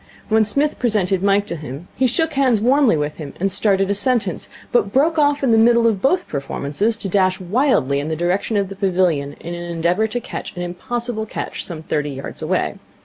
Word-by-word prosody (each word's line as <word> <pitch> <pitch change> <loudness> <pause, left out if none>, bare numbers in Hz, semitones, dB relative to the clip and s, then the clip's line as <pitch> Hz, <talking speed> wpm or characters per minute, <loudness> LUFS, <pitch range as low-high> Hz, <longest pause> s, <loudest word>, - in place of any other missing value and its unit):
When 220 0 +4
Psmith 280 +8 +1
presented 200 -6 +1
Mike 200 +1 +2
to 170 - -4
him, 150 +1 -8
he 260 - +2
shook 320 +5 0
hands 260 -5 +3
warmly 250 - +3
with 150 0 -3
him 150 -3 -8
and 195 +2 0
started 195 -1 +2
a - - +3
sentence, 205 -4 -1 0.2
but 205 -5 +2
broke 310 +6 +2
off 290 -1 +2
in 260 - +3
the 225 - +5
middle 235 +1 +5
of 215 -4 +2
both 355 +7 +1
performances 145 +9 -2
to 205 - -3
dash 185 -1 +2
wildly 185 - +1
in 145 - -4
the 160 - -2
direction 180 +6 0
of 200 -2 0
the 195 - -7
pavilion 180 -7 0
in 170 - -7
an 175 0 -6
endeavour 170 +6 +1
to 245 +3 -3
catch - - -7
an 175 - -4
impossible 220 +5 -4
catch - - -5
some 160 -3 -7
thirty 150 -2 -1
yards 135 -1 -7
away. - - -1
200 Hz, 210 wpm, -20 LUFS, 175-240 Hz, 0.2 s, the